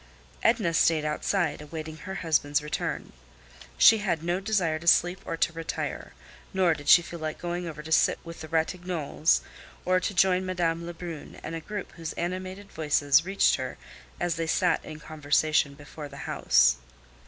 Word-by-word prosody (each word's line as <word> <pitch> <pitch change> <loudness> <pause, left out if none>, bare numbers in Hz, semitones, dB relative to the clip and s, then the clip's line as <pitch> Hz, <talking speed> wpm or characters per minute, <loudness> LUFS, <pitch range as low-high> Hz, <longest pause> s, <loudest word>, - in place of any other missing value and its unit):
Edna 170 -7 +2
stayed 160 -2 +3
outside, 150 +1 -1
awaiting 155 +1 -7
her 190 +3 -7
husband's 150 -2 +2
return. 150 - -4 0.6
She 225 - +7
had 175 -6 -1
no 175 +2 0
desire 190 -6 0
to 170 - -10
sleep 175 +2 +4
or 165 - -3
to 165 - +1
retire; 165 0 -5 0.4
nor 185 -3 +4
did 145 -2 -5
she 175 - +8
feel 170 0 -8
like 155 -1 -4
going 175 0 -4
over 150 -2 -7
to 160 - -9
sit - - +4
with 165 0 -9
the 160 - -7
Ratignolles, 165 -1 0 0.4
or 185 0 +3
to 200 - -2
join 185 0 +4
Madame 170 -2 -1
Lebrun 170 -2 -8
and - - -5
a 165 - -4
group 205 +5 -6
whose 165 -1 -6
animated 185 +3 -5
voices 150 0 +3
reached 195 +1 +3
her - - -5 0.4
as 175 -1 -1
they 165 0 -2
sat - - +2
in 155 0 -9
conversation 150 -1 +1
before 145 +1 -9
the 140 - -11
house. 60 0 +3
165 Hz, 170 wpm, -27 LUFS, 155-180 Hz, 0.6 s, she